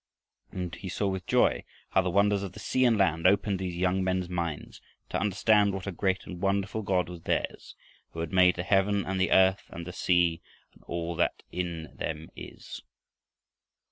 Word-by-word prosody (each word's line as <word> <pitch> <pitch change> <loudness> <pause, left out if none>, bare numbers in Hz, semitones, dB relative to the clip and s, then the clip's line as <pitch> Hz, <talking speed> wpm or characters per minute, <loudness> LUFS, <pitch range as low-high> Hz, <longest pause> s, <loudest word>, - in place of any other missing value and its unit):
And 90 -2 -5
he 95 - -7
saw 100 +2 -1
with 95 -1 -3
joy - - +3 0.3
how - - +4
the 95 - -1
wonders 100 +2 +3
of 95 -2 -6
the - - -10
sea 130 0 +1
and 115 -3 +4
land 85 -3 +3
opened 100 0 +2
these 90 -2 -3
young 95 +1 +1
men's 95 -1 0
minds 85 -4 -4 0.3
to - - -1
understand 100 0 +3
what 95 - -5
a 100 - -3
great 95 +1 -1
and 90 -1 -8
wonderful 100 +2 0
God 95 -4 0
was 90 -1 -9
theirs, - - -3 0.4
who 80 - -4
had 85 +2 -5
made 90 -1 +5
"the 90 - -3
heaven 100 +1 +2
and 95 0 -2
the 95 - +2
earth 95 +1 +4
and 85 0 -8
the 90 - -7
sea, 85 -2 +2 0.3
and - - -22
all 85 0 -3
that 85 - 0
in 85 -3 -4
them 80 0 -5
is." - - -9
95 Hz, 195 wpm, -28 LUFS, 85-100 Hz, 0.4 s, made